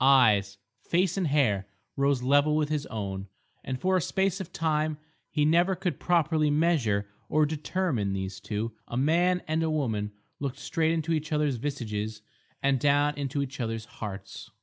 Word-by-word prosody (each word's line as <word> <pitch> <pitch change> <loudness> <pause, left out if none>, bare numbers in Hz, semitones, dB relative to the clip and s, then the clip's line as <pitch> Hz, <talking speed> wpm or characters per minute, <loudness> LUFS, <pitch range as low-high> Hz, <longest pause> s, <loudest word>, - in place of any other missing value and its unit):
Eyes, 105 -7 +5 0.2
face 180 +5 +1
and 190 -4 0
hair 115 -10 +2 0.3
rose 140 -2 +2
level 145 +3 +4
with 155 -1 +1
his 150 -2 -1
own, 100 -3 -4 0.4
and 130 -1 -3
for 185 +4 +2
a 185 - +3
space 190 +4 0
of 185 - -8
time 155 -1 0 0.3
he 150 -1 +1
never 175 +4 +4
could 180 -1 -2
properly 160 -3 +2
measure, 145 -10 +2 0.2
or 155 0 +4
determine, 150 - -1
these 95 -1 -4
two, 105 +3 -3 0.2
a 120 - -4
man 175 +6 +3
and 155 +1 +1
a 160 - +1
woman, 110 -9 -1 0.3
looked 140 -2 -3
straight 160 +3 0
into 165 0 0
each 155 0 -2
other's 150 -4 +1
visages 110 -5 -4 0.4
and 135 -1 +3
down 145 +2 +3
into 140 0 -1
each 135 0 -7
other's 115 -2 -2
hearts. 95 -3 -8
145 Hz, 170 wpm, -28 LUFS, 110-160 Hz, 0.4 s, Eyes